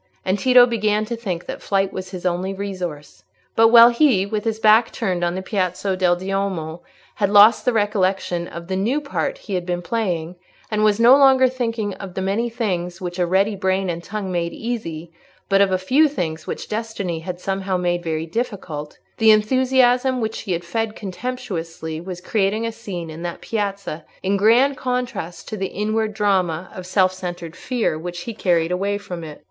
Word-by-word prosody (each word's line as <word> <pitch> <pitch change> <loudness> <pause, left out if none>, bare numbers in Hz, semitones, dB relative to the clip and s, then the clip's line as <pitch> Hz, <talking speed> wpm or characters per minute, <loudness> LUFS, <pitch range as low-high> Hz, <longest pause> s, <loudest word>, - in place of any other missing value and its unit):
And 190 +2 0
Tito 250 +2 +7
began 215 -2 0
to 235 +2 -4
think 190 -7 -4
that - - -6
flight 195 -1 0
was 185 0 -6
his 185 -1 -8
only 180 +2 -1
resource. 175 - -6 0.3
But 225 0 +6
while 235 +1 +8
he, 235 -6 +3
with 210 +1 -3
his 225 -1 0
back 220 +1 +5
turned 185 -6 -2
on 175 0 0
the 190 - -4
Piazza 190 -1 -1
del 180 -1 +3
Duomo, 185 -3 -3 0.4
had 200 -2 +1
lost 210 +2 +6
the 250 - +4
recollection 195 -5 0
of 170 0 -9
the 190 - -2
new 225 +10 +1
part 300 +12 -3
he 210 - -8
had 180 -1 -1
been 175 0 -3
playing, 180 -6 -2 0.3
and 215 0 +1
was 210 0 +3
no 240 +3 +8
longer 265 -2 +6
thinking 230 -5 -2
of 190 -2 -9
the 190 - -2
many 210 +5 0
things 180 -7 -3
which 180 -1 -5
a 175 - +2
ready 195 +4 +2
brain 190 -1 0
and 170 0 -6
tongue 200 -1 -4
made 170 -1 -2
easy, 175 -9 -5 0.4
but 195 0 +4
of 195 -1 +3
a 185 - +2
few 260 +12 +3
things 160 - -4
which - - -5
destiny 210 -6 -3
had 175 +2 -6
somehow 195 0 -2
made 175 -1 0
very 160 -1 -2
difficult, 170 -7 -4 0.2
the 225 -1 +5
enthusiasm 255 +3 +3
which 220 -1 -3
he 195 - -3
had 170 0 -3
fed 220 +4 -2
contemptuously 180 -7 -5
was 180 0 -7
creating 210 +3 0
a 230 - -2
scene 190 -8 -7
in 160 +2 -9
that 175 -1 -5
piazza 200 -7 -3 0.2
in 195 +1 +1
grand 235 +7 +4
contrast 250 -9 -4
with 215 - -4
the 190 - -1
inward 215 +2 -1
drama 185 -5 0
of 185 -1 -8
self 185 -1 +3
centred 175 -2 -6
fear 230 -9 -1
which 175 +1 -6
he 230 - -5
had 220 - -14
carried 170 -2 +2
away 200 +3 0
from 180 -5 -7
it. 150 -2 -9
195 Hz, 195 wpm, -21 LUFS, 175-225 Hz, 0.4 s, while